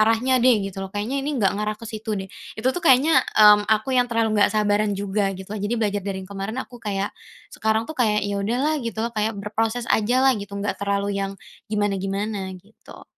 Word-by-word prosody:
arahnya 230 +4 +3
deh," 235 -5 +4
gitu 195 0 -6
loh, 195 - -4
"kayaknya 215 +8 -2
ini 290 +1 -2
nggak 200 -6 +2
ngarah 210 0 -2
ke 230 - -12
situ 220 -1 -4
deh." 190 - -4 0.3
Itu 250 +4 +1
tuh 355 - -4
kayaknya, 295 +1 +5 0.2
mmm, 210 -1 +7
aku 220 +4 +1
yang 245 -1 +3
terlalu 225 -2 +1
nggak - - +6
sabaran 205 -1 +1
juga 200 0 0
gitulah. 195 +2 -7
Jadi 210 +4 -1
belajar 205 -3 0
dari 190 -1 -5
yang 195 - -17
kemarin, 200 +4 -4
aku 245 -2 -14
kayak, 200 -2 -2 0.4
sekarang 220 +1 0
tuh 315 - -7
kayak, 210 -6 +1
ya 200 0 -2
udahlah 265 +9 0
gitu 230 -2 -3
loh, 235 - -3
kayak 215 0 -1
berproses 220 +4 -2
ajalah, 255 +5 +3
gitu, 200 0 -7
nggak 200 0 -3
terlalu 200 0 0
yang 195 0 -3 0.3
gimana-gimana 200 -1 -2
gitu. 205 +5 -16
210 Hz, 205 wpm, -23 LUFS, 200-230 Hz, 0.4 s, mmm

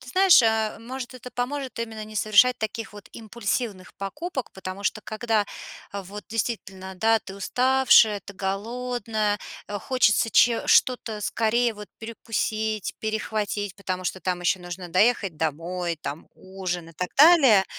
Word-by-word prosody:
Ты 255 - -14
знаешь, 375 -8 +6
э-э, 220 -1 +1
может, 255 +1 -7
это 250 0 -10
поможет 260 +1 -4
именно 225 -2 -5
не 215 0 -9
совершать 215 +4 +4
таких 220 0 -4
вот 205 -1 -12
импульсивных 215 -3 -4
покупок. 265 - -5
Потому 190 +1 -7
что 215 - 0
когда, 215 -1 -1 0.5
а, 200 - -4
вот 205 +3 -9
действительно, 195 -4 -4
да, 225 +3 +3
ты 195 - -10
уставшая, 250 -1 +4
ты 200 - -11
голодная, 215 +2 -2 0.3
э, 205 - -3
хочется 245 -3 +2
че 235 +2 +4
что-то 230 -4 +3
скорее 230 +3 +1
вот 210 0 -10
перекусить, 220 -2 -3
перехватить. 215 -2 -2
Потому 185 -2 -4
что 185 - -3
там 180 -1 -2
ещё 175 +1 +1
нужно 175 0 -7
доехать 195 -1 +2
домой, 170 +3 -2
там 145 +3 -6
ужин 185 -3 -5
и - - -18
так 180 +3 -4
далее. 275 - +7
215 Hz, 150 wpm, -25 LUFS, 190-235 Hz, 0.5 s, далее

